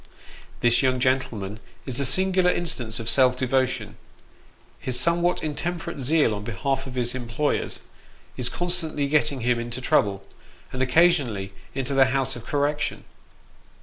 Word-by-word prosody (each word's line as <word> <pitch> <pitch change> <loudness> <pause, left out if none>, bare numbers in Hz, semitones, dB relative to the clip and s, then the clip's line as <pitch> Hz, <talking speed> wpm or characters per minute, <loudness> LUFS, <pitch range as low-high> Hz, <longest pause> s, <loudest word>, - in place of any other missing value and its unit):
This 120 0 +4
young 130 -2 +2
gentleman 115 -6 -1 0.3
is 130 -2 0
a 140 - +2
singular 185 +2 +3
instance 125 -11 -2
of 115 - -6
self 125 0 +4
devotion; 130 0 0 0.8
his 125 -1 -1
somewhat 170 +4 +1
intemperate 165 +1 -3
zeal 140 -3 +2
on 100 -1 -5
behalf 135 +6 -2
of 130 - -8
his 120 -1 0
employers, 125 +3 -2 0.5
is 125 -1 -1
constantly 160 -3 -1
getting 145 -2 +1
him 120 0 +1
into 120 +1 -5
trouble, 100 -6 +1 0.5
and 130 - -3
occasionally 130 - +2 0.2
into 135 0 -2
the 135 -1 +6
House 135 0 0
of 115 -1 -10
Correction. 145 +1 -1
130 Hz, 140 wpm, -25 LUFS, 120-150 Hz, 0.8 s, the